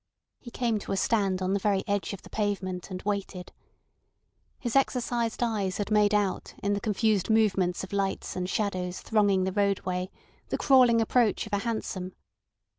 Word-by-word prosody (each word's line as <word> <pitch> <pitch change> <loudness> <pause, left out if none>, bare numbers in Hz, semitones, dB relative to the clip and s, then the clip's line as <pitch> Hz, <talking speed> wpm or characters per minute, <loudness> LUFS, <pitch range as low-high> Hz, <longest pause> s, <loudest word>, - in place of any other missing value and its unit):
He 245 - -10
came 235 -2 -1
to - - -7
a 195 - 0
stand 195 -3 +1
on 185 +1 0
the 200 - +1
very 195 -1 +1
edge 200 -1 -1
of 200 - -8
the - - -13
pavement, 195 -4 -2
and 185 -1 -6
waited. 200 -3 -3 1.1
His 240 -2 -4
exercised 240 -3 +1
eyes 205 -5 -1
had 205 0 -3
made 210 -1 +4
out 205 -2 -1
in 200 0 +1
the 200 - -2
confused 215 -2 +1
movements 195 -5 +2
of 190 - -8
lights 195 -1 -2
and 180 0 -3
shadows 185 -4 -2
thronging 205 -4 +2
the 190 - -1
roadway 185 -2 0 0.4
the - - -1
crawling 250 -4 +5
approach 225 -1 +2
of - - -11
a 205 - +2
hansom. 200 -5 -4
200 Hz, 175 wpm, -28 LUFS, 190-220 Hz, 1.1 s, crawling